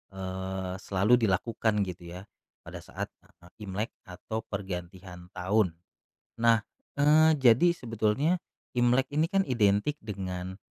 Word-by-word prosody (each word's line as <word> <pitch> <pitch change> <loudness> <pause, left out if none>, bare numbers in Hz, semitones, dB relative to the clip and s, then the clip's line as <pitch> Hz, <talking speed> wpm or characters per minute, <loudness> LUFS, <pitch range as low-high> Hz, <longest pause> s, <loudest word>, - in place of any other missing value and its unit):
eee, 95 0 -4
selalu 100 +5 +3
dilakukan 110 0 +1
gitu 85 -1 -8
ya, - - -11 0.4
pada - - -8
saat, - - -5 0.2
eee, 85 0 -21 0.2
Imlek 105 +4 -3 0.2
atau 100 +5 -5
pergantian 90 -2 -6
tahun. 95 -1 +1 0.7
Nah, 115 -2 +5 0.4
eee, 155 +2 +6
jadi 130 +7 +6
sebetulnya 115 - 0 0.4
Imlek 125 +2 +3
ini 155 +2 +3
kan 195 -1 +3
identik 110 +3 +2
dengan, 95 -2 -5
105 Hz, 115 wpm, -29 LUFS, 95-120 Hz, 0.7 s, eee